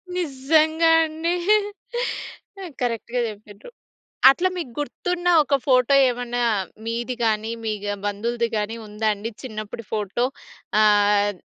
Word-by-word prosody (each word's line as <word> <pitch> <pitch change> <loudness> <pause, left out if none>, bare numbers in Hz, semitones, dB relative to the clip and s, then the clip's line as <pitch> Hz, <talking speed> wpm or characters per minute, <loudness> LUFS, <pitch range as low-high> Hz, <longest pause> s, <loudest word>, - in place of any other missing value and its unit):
నిజ్జంగా 315 +1 +2
అండి. 320 +2 -2 1.5
కరక్ట్‌గా 240 0 -2
చెప్పిన్రు. 205 0 -12 0.6
అట్లా 355 +7 +1
మీకు 310 -9 -5
గుర్తున్న 355 +4 -2
ఒక 280 0 +1
ఫోటో 255 0 +4
ఏమన్నా 245 0 -3 0.5
మీది 235 +2 -2
గానీ, 220 0 0
మీ 220 - -1
గా 205 - -1
బంధువులుది 230 +3 -1
గానీ 210 +2 -2
ఉందా 210 +1 -2
అండి 210 +3 -6
చిన్నప్పుడి 215 -2 -7
ఫోటో? 215 +3 -1 0.6
ఆహ్, 205 -1 +4
235 Hz, 110 wpm, -23 LUFS, 210-280 Hz, 1.5 s, ఫోటో